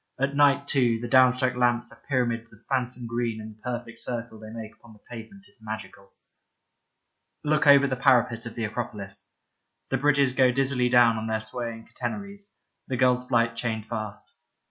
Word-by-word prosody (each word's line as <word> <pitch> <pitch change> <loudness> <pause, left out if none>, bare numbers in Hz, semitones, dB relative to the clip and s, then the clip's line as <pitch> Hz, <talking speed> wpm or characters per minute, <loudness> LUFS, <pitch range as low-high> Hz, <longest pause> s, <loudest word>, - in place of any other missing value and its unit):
At 140 +1 0
night, 140 0 +4
too, 120 -5 +2
the 120 - -5
down 130 +1 +6
struck 130 0 0
lamps 120 -1 +1
are - - -17
pyramids 120 -3 0
of 110 +1 -19
phantom 125 -2 -2
green 115 -1 -2
and 110 0 -9
the 110 - -30
perfect 120 -2 -5
circle 115 -2 -5
they 110 0 -10
make 110 -1 -8
upon 115 0 -18
the 105 - -19
pavement 125 - -10
is 205 - -18
magical. 105 -2 -8 1.3
Look 150 0 +2
over 140 0 +8
the 135 -2 0
parapet 125 -3 +2
of 115 - -9
the 115 - -3
Acropolis. 105 -3 -6 0.6
The 135 - +1
bridges 140 -2 +3
go 130 -1 +4
dizzily 130 -1 +1
down 120 -2 +5
on 110 - -4
their 110 0 0
swaying 115 +1 -6
catenaries, 200 -1 -6 0.3
the 130 - -2
gull's 125 0 +2
flight 115 -1 +2
chained 115 -2 -3
fast. 110 -3 -6
120 Hz, 180 wpm, -26 LUFS, 115-130 Hz, 1.3 s, over